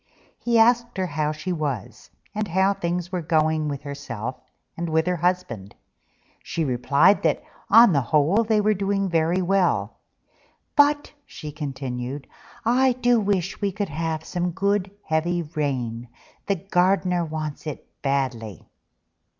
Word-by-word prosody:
He 235 -1 +1
asked 235 0 +3
her 190 - 0
how 150 -2 -1
she 155 +4 -4
was, 145 - -4 0.2
and 215 0 -2
how 190 +3 +2
things 175 -2 -3
were 180 -2 -2
going 155 -1 +1
with 145 -1 -4
herself 130 -5 -5 0.4
and 170 0 -3 0.2
her 180 0 +1
husband. 160 - -2 0.7
She 165 - -2
replied 135 +8 +3
that - - +1 0.3
on 230 -4 +8
the 140 - +3
whole 155 - +3
they 220 -1 +2
were 215 +1 +3
doing 195 0 0
very 170 +2 +1
well: 190 0 +1 0.8
"But," 290 0 +3
she 150 -2 -8
continued, 135 -2 -5 0.4
"I 255 +2 +4
do 245 -1 +3
wish 195 -3 -1
we 200 -1 +1
could 205 +1 -3
have 160 +1 -2
some 180 0 -1
good 200 +1 0 0.2
heavy 170 +2 0
rain: 130 -7 -3 0.4
the 200 - +2
garden 180 -1 +1
wants 155 -1 -5
it 150 - -6 0.2
badly." 130 -7 -2
170 Hz, 140 wpm, -24 LUFS, 145-195 Hz, 0.8 s, on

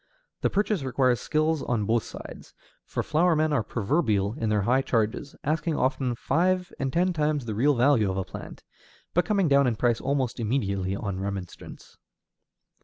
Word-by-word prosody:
The - - +2
purchase 205 -2 0
requires 130 -2 +1
skill 155 -1 0
on 115 -4 0
both 115 +2 +2
sides, - - -11 0.3
for - - -2
flower 170 +2 +2
men 155 0 +1
are 135 - +2
proverbial 110 - 0
in 115 -4 -2
their 105 -2 +1
high 125 +6 +3
charges, 115 +2 -1
asking 155 +2 0
often 130 -1 0
five 180 +7 0
and 135 -1 -1
ten 180 +5 +1
times 150 -4 0
the 110 - -3
real 135 +7 +3
value 120 -4 +3
of 95 - -2
a 95 - 0
plant, - - -9 0.5
but 175 - +2
coming 200 -5 +2
down 140 -2 +4
in 120 - +1
price 120 +1 +1
almost 130 -3 -1
immediately 100 -5 -1
on 100 -2 -4
remonstrance. 95 -2 -7
130 Hz, 175 wpm, -26 LUFS, 110-155 Hz, 0.5 s, down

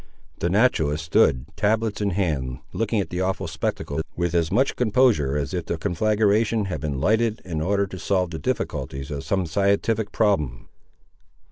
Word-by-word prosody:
The 85 - 0
naturalist 80 -8 +2
stood, 65 -4 +3
tablets 110 0 0
in 100 - +1
hand, 75 -10 -1 0.2
looking 115 -1 0
at 100 - -3
the 90 +1 -2
awful 95 0 -1
spectacle 70 +2 -3
with 85 -1 -1
as 85 -2 +1
much 135 +2 +2
composure 110 - +2
as 75 +4 -3
if 90 -3 -3
the 85 - -1
conflagration 105 +5 +1
had 80 -7 -4
been 70 -3 -2
lighted 110 +6 +2
in 80 -4 -3
order 100 +4 +1
to 95 -1 -8
solve 90 -2 0
the 80 - -5
difficulties 70 0 -3
of 70 -2 -4
some 95 -2 0
scientific 100 +4 +1
problem. 75 - 0
95 Hz, 165 wpm, -24 LUFS, 80-105 Hz, 0.2 s, stood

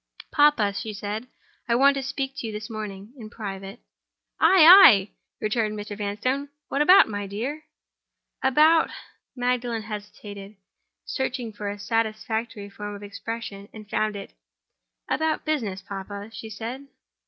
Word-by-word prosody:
"Papa," 290 -9 +4
she 215 +2 -5
said, 210 +4 -5 0.4
"I 235 - +3
want 275 +3 +5
to 275 - -2
speak 270 0 -4
to 230 - -4
you - - -4
this 210 +1 -7
morning—in 215 +2 -8
private." 195 -3 -7 0.6
"Ay! 370 -5 +7
ay!" 315 - +9 0.3
returned 215 -1 -1
Mr. 205 0 -6
Vanstone. 225 +8 -2 0.2
"What 280 - 0
about, 370 +6 +7
my 205 -2 -4
dear!" 255 +10 -5 0.8
"About—" 305 +5 +4 0.5
Magdalen 245 -2 -1
hesitated, 205 -1 -9 0.5
searching 250 -4 -3
for 205 0 -5
a 205 - -5
satisfactory 220 0 -2
form 205 +1 -7
of 205 - -10
expression, 205 -1 -7
and 215 -1 -10
found 215 +1 -1
it. 200 - -8 0.7
"About 315 0 -1
business, 220 -12 -2
papa," 200 +2 -7
she 220 - -8
said. 235 +6 -7
220 Hz, 135 wpm, -25 LUFS, 205-260 Hz, 0.8 s, ay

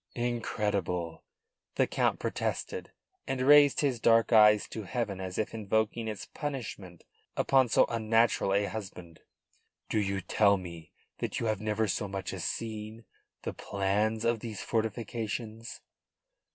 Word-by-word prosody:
"Incredible!" 105 -8 -2 0.5
the - - +3
Count - - +1
protested, - - -3 0.4
and 135 -1 -2
raised 145 0 +6
his 135 -5 0
dark 115 +1 +4
eyes 105 -1 +6
to 110 - -5
heaven 100 -2 -3
as 95 -1 -5
if 110 - -2
invoking 110 +1 -1
its 105 -3 -5
punishment 105 - -6 0.3
upon 130 -2 +3
so - - +5
unnatural 115 -2 +2
a 100 +1 +2
husband. 95 -6 -7 0.7
"Do 110 - +1
you 100 -1 -1
tell 100 +1 +3
me 85 -3 -9 0.3
that - - -2
you - - -2
have 110 -2 -1
never 110 0 0
so 105 +2 -1
much 95 -1 -5
as - - -5
seen 110 0 -5 0.4
the - - -3
plans 105 +3 -1
of 115 -1 +2
these 110 -3 -6
fortifications?" 115 0 -3
110 Hz, 140 wpm, -30 LUFS, 100-115 Hz, 0.7 s, raised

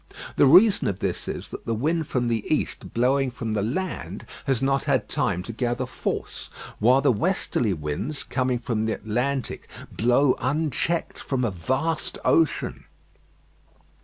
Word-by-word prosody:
The - - +5
reason 195 +8 +6
of 95 - -1
this 95 -3 -3
is, - - -5
that - - -9
the 115 - 0
wind 155 +6 0
from 120 -2 0
the 115 -2 0
east - - -1
blowing 130 +3 +2
from 115 -3 -4
the 105 - 0
land 165 - -3 0.2
has 135 -4 +2
not 135 +1 +1
had - - +1
time 90 - 0
to 115 - -6
gather 120 +2 -1
force; 125 - -4 0.3
while 125 +5 +5
the 140 -2 +4
westerly 120 - 0
winds, 75 - -3
coming 130 -1 0
from 115 -2 -2
the 110 - +1
Atlantic, 125 +4 -2 0.2
blow 125 +4 +3
unchecked 155 +4 0
from 130 -3 -1
a 110 - 0
vast 130 - -1
ocean. 165 -2 +1
125 Hz, 155 wpm, -25 LUFS, 115-140 Hz, 0.3 s, reason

